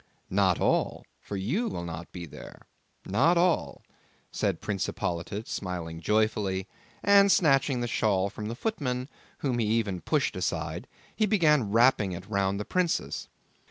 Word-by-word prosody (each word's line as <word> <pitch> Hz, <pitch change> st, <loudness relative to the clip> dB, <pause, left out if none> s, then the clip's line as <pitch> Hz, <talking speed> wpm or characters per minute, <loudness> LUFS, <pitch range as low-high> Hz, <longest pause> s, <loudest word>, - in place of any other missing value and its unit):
"Not -, -, +3 dB
all, -, -, +1 dB
for 100 Hz, -, -6 dB
you 150 Hz, -, -1 dB
will 135 Hz, -, -4 dB
not 85 Hz, 0 st, -7 dB
be 90 Hz, -2 st, -7 dB
there; 80 Hz, -, -12 dB, 0.4 s
not 140 Hz, -, +3 dB
all," 175 Hz, 0 st, +1 dB, 0.5 s
said -, -, -1 dB
Prince 100 Hz, -2 st, -2 dB
Hippolyte 100 Hz, +5 st, -3 dB
smiling 85 Hz, -3 st, -4 dB
joyfully; 105 Hz, -1 st, +1 dB, 0.4 s
and 200 Hz, 0 st, +6 dB
snatching 135 Hz, -6 st, +3 dB
the 120 Hz, -, -1 dB
shawl 100 Hz, -4 st, +1 dB
from 105 Hz, -, -6 dB
the 115 Hz, -, -4 dB
footman, 130 Hz, -, -2 dB, 0.4 s
whom 125 Hz, -3 st, +1 dB
he 110 Hz, -, +1 dB
even 105 Hz, -5 st, 0 dB
pushed -, -, 0 dB
aside, -, -, -3 dB, 0.3 s
he 215 Hz, -, +2 dB
began 150 Hz, -, +3 dB
wrapping 115 Hz, -3 st, +4 dB
it 90 Hz, +2 st, -8 dB
round 100 Hz, -1 st, 0 dB
the 105 Hz, -, -4 dB
princess. 170 Hz, -, -1 dB
110 Hz, 150 wpm, -28 LUFS, 95-140 Hz, 0.5 s, and